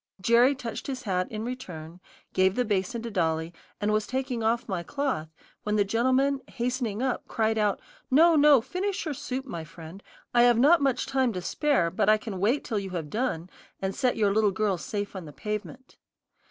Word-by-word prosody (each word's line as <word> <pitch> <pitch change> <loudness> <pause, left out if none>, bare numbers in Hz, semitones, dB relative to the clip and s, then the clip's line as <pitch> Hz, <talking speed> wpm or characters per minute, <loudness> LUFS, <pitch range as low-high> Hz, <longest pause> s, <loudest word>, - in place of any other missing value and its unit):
Jerry 235 +7 +4
touched 235 -4 -6
his 260 -2 -4
hat 185 -4 0
in 215 0 -4
return, 180 -10 -7 0.3
gave 190 +1 +3
the 250 - +1
basin 205 +2 -1
to 235 - -5
Dolly, 165 -3 0 0.3
and 210 +1 0
was 215 0 0
taking 260 -2 -2
off 225 +2 0
my 190 -5 -2
cloth, 265 - -2 0.3
when 210 0 -1
the 205 -1 +3
gentleman, 260 +6 +2
hastening 240 -2 -2
up, 260 -2 -2
cried 220 0 0
out, 210 -2 +1 0.3
"No, 325 +5 +6
no, 290 -4 +6
finish 390 - -3
your 310 - -2
soup, 265 -1 -4
my 170 -11 -6
friend; 165 +4 -11 0.3
I 240 - +5
have 240 -1 +5
not 295 +7 +5
much 270 -3 +1
time 265 -2 +1
to 180 - -4
spare, 185 - +1
but 195 +3 +1
I 215 - +6
can 215 -4 -6
wait 230 +9 +1
till 215 - -2
you 195 -1 -5
have 165 -5 -5
done, 215 -8 -2 0.3
and 190 0 -2
set 255 -3 0
your 205 -3 +2
little 215 0 +3
girl 195 -1 0
safe 205 +3 -4
on 185 -3 -6
the 150 - -9
pavement." 210 - -6
220 Hz, 200 wpm, -27 LUFS, 190-260 Hz, 0.3 s, No